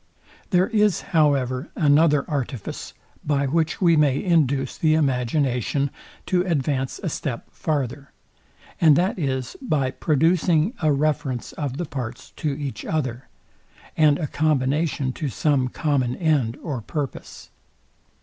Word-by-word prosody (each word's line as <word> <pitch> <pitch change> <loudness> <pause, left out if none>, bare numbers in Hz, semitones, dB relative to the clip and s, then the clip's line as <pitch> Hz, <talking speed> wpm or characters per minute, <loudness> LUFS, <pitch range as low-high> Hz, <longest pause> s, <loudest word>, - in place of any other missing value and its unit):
There 180 -2 +4
is, 210 -5 +2
however, 140 -4 +2
another 150 -1 +3
artifice, 135 - -4 0.3
by 140 -1 +1
which 155 +3 0
we 170 -3 +4
may 145 -3 +2
induce 140 -7 +1
the 155 -1 +2
imagination 135 -1 0 0.3
to 180 -2 +2
advance 140 -6 -1
a - - -1
step 135 -6 -4
farther; 140 -3 -3 0.7
and 155 -4 +7
that 185 +4 +1
is, 130 -4 -2
by 145 - 0
producing 165 - +2
a 155 -2 +3
reference 145 -4 -1
of 140 -3 -4
the 175 - -2
parts 125 -4 -6
to 155 - -1
each 140 -1 -5
other, 130 -5 -3 0.7
and 150 -2 +4
a 160 - -2
combination 145 -2 0
to 150 0 -3
some 135 -1 +1
common 130 -3 0
end 145 -9 +1
or 140 -7 -3
purpose. 145 +3 -6
145 Hz, 130 wpm, -23 LUFS, 130-160 Hz, 0.7 s, and